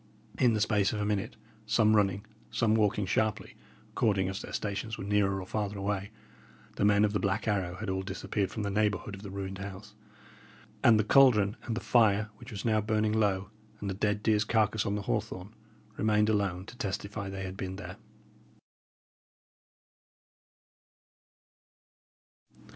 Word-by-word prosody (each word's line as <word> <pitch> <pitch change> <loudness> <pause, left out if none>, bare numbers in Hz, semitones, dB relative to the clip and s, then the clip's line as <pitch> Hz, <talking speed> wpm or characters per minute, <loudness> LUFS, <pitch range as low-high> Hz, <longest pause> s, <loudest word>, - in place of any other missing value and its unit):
In 120 -2 +4
the 105 - 0
space 105 -1 +2
of 105 - -2
a 105 - 0
minute, 105 -2 -1 0.3
some 110 0 +4
running, 100 0 +1 0.2
some 110 -1 +1
walking 105 -2 +2
sharply, 110 +3 -1 0.4
according 95 -4 +1
as 95 +3 -4
their - - -8
stations 110 +2 -3
were - - -6
nearer 100 -1 +1
or 95 - -6
farther 105 +1 -3
away, 100 0 -2 0.7
the - - 0
men 105 0 +5
of 105 - -1
the 105 - +1
Black 100 +3 -1
Arrow 95 -4 0
had 110 +3 -6
all 95 0 -1
disappeared 95 +1 -2
from 110 - -4
the 100 - -2
neighbourhood 105 0 0
of 100 - -8
the 100 - -8
ruined 95 0 -5
house; 100 +1 -8 0.9
and 110 -2 +6
the - - +3
caldron, 110 -4 +5
and 115 -1 -2
the - - -3
fire, 110 -2 +3
which 120 0 -12
was 100 0 -6
now 110 -2 +3
burning 110 0 +1
low, 100 -2 +1 0.3
and 100 -1 -3
the - - -2
dead 105 +1 -1
deer's 105 -1 +3
carcase 110 -1 +1
on 100 - 0
the 105 - -3
hawthorn, 110 -3 -3 0.4
remained 105 0 +2
alone 100 -4 0
to 125 - -11
testify 100 -1 -4
they 95 0 -5
had 95 0 -5
been 95 -1 -5
there. 100 - -8
105 Hz, 165 wpm, -30 LUFS, 100-110 Hz, 0.9 s, and